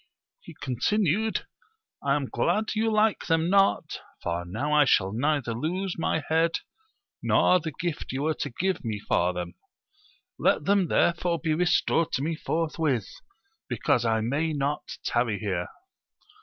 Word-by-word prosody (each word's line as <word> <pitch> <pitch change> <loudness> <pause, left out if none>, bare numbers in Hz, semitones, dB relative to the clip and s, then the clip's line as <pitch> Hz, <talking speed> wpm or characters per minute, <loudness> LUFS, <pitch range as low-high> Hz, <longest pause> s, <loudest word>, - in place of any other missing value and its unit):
He - - -13
continued, 205 - 0 0.6
I 140 0 +2
am 145 -2 -1
glad 215 +10 0
you 220 +1 +1
like 215 0 +2
them 165 +1 +2
not, 195 0 +2 0.2
for 85 0 -2
now 125 +12 -2
I 150 0 +6
shall 95 -7 +3
neither 135 0 0
lose 175 +9 -2
my 160 -1 -1
head, 165 +1 +2 0.7
nor 185 - +4
the 160 -1 -5
gift 170 +1 -4
you 135 +2 -2
were 160 +1 +1
to - - -4
give 185 +10 -2
me 110 -3 -2
for 90 -3 +1
them: 90 -1 -5 0.9
let - - +2
them 200 -2 +3
therefore 170 +1 +2
be 160 -2 0
restored 170 -1 +2
to 135 - 0
me 165 +2 -1
forth 165 +1 -2
with, 130 -10 +1 0.6
because 120 - +1
I 110 -1 +1
may 145 +8 0
not 145 0 -1 0.2
tarry 120 -3 +1
here. 95 -5 -2
155 Hz, 155 wpm, -27 LUFS, 120-175 Hz, 0.9 s, I